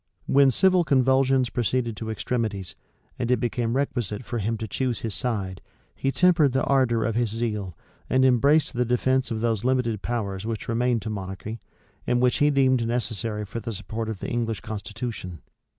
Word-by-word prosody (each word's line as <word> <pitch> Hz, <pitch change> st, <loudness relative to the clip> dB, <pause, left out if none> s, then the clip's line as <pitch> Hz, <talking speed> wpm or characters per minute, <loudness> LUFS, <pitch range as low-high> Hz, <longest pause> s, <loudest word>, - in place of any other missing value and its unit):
When 140 Hz, 0 st, +5 dB
civil 185 Hz, +6 st, +4 dB
convulsions 130 Hz, -3 st, +3 dB
proceeded 120 Hz, 0 st, 0 dB
to 110 Hz, +2 st, -5 dB
extremities, 110 Hz, -4 st, -2 dB, 0.4 s
and 120 Hz, -1 st, -1 dB
it 125 Hz, -, +3 dB
became 120 Hz, -1 st, -1 dB
requisite 120 Hz, -5 st, -2 dB
for 120 Hz, -1 st, -3 dB
him 110 Hz, +2 st, -1 dB
to 110 Hz, -, -5 dB
choose 125 Hz, +2 st, -2 dB
his 110 Hz, -3 st, -2 dB
side, 100 Hz, -5 st, -2 dB, 0.3 s
he 135 Hz, -, -1 dB
tempered 165 Hz, -5 st, +4 dB
the 135 Hz, -, +1 dB
ardor 125 Hz, -5 st, +2 dB
of 115 Hz, -, 0 dB
his 120 Hz, 0 st, +1 dB
zeal, 105 Hz, -5 st, -3 dB, 0.3 s
and 130 Hz, 0 st, +4 dB
embraced 140 Hz, +5 st, +4 dB
the 125 Hz, 0 st, +1 dB
defence 130 Hz, +2 st, +1 dB
of 110 Hz, -1 st, -3 dB
those 115 Hz, -2 st, 0 dB
limited 125 Hz, -5 st, +1 dB
powers 100 Hz, -5 st, -3 dB
which 110 Hz, -1 st, -4 dB
remained 120 Hz, 0 st, +1 dB
to 110 Hz, -, -3 dB
monarchy, 100 Hz, +3 st, -6 dB, 0.5 s
and 120 Hz, -, +2 dB
which 125 Hz, 0 st, +3 dB
he 145 Hz, -, +4 dB
deemed 130 Hz, -4 st, +3 dB
necessary 110 Hz, -3 st, -2 dB
for 115 Hz, -, -5 dB
the 115 Hz, +1 st, -5 dB
support 110 Hz, +3 st, -5 dB
of 105 Hz, -4 st, -5 dB
the -, -, -3 dB
English 115 Hz, -2 st, -2 dB
constitution. 110 Hz, -, -6 dB
115 Hz, 180 wpm, -25 LUFS, 110-130 Hz, 0.5 s, When